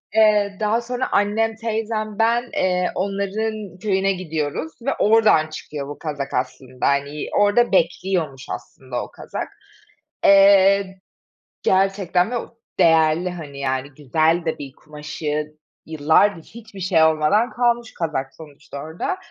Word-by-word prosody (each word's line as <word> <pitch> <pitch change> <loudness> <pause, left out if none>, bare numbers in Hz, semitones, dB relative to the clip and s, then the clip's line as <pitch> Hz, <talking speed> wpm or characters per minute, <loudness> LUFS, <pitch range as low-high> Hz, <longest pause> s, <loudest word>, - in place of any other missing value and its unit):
Eee, 210 -2 +4
daha 215 +2 +1
sonra 250 +2 -3
annem, 220 +2 +1
teyzem, 220 -1 -3
ben, 235 +2 +2
eee, 180 -1 +1
onların 200 0 -3
köyüne 195 -1 +1
gidiyoruz 160 -3 -3
ve 275 +3 0
oradan 215 -7 +4
çıkıyor 150 -2 -7
bu 145 - -8
kazak 145 -3 -5
aslında. 130 0 -3
Hani, 140 +1 -1
orada 205 +3 +3
bekliyormuş 170 -6 0
aslında 130 -2 -6
o - - -11
kazak. - - -6 0.8
Eee, 195 -1 +5 0.7
gerçekten 190 +1 +2
ve 245 - 0
o 235 - -8 0.2
değerli, 165 +1 +4
hani, 150 -6 -8
yani, 130 0 -2
güzel 160 +4 +1
de 160 - -1
bir 140 -2 -8
kumaşı, 150 0 -5 0.3
yıllardır 160 +4 +2
hiçbir 220 -4 -13
şey 170 -3 +3
olmadan 160 +10 +3
kalmış 240 -1 0
kazak 135 -5 -3
sonuçta 150 -2 -12
orada. 160 - -4
185 Hz, 125 wpm, -21 LUFS, 150-210 Hz, 0.8 s, Eee